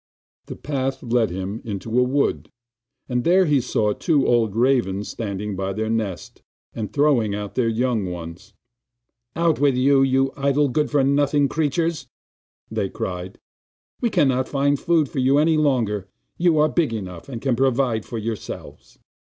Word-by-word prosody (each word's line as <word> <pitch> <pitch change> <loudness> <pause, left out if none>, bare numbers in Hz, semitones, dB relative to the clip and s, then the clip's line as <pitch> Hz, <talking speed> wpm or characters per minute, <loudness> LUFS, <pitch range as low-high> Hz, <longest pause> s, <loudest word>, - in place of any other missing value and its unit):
The - - -7
path 135 -2 -3
led 120 -2 +1
him 95 +5 -5
into 110 +3 -2
a - - +5
wood, 135 +3 0 0.6
and 125 -1 -1
there 185 +2 +4
he 145 -4 +2
saw 105 -3 0
two 150 - +1
old 115 -4 +2
ravens 115 -5 +1
standing 105 -2 -4
by 95 +1 -3
their 110 +2 -2
nest, 105 -6 -4 0.3
and 105 -4 -5
throwing 135 -8 +2
out 105 -1 -5
their 125 -3 +1
young 115 -3 0
ones. 90 +4 -9 0.8
'Out 165 -3 +1
with 140 -2 +3
you, 135 +2 +4
you 135 0 +2
idle, 140 +1 +1
good 150 +4 0
for 145 -2 +2
nothing 140 +1 +2
creatures!' 160 +2 -1 0.9
cried 90 0 -5
they; - - -26 0.6
'we 235 - +2
cannot 135 - +1
find 140 0 +1
food 165 -4 +2
for 135 - -4
you 130 +2 +3
any 160 +2 +3
longer; 120 -10 0 0.3
you 170 -2 +2
are 150 0 +5
big 155 -6 0
enough, 90 -1 -7
and 120 -4 -5
can 130 0 0
provide 130 -3 +1
for 120 - -6
yourselves. 110 0 -7
130 Hz, 160 wpm, -22 LUFS, 110-145 Hz, 0.9 s, a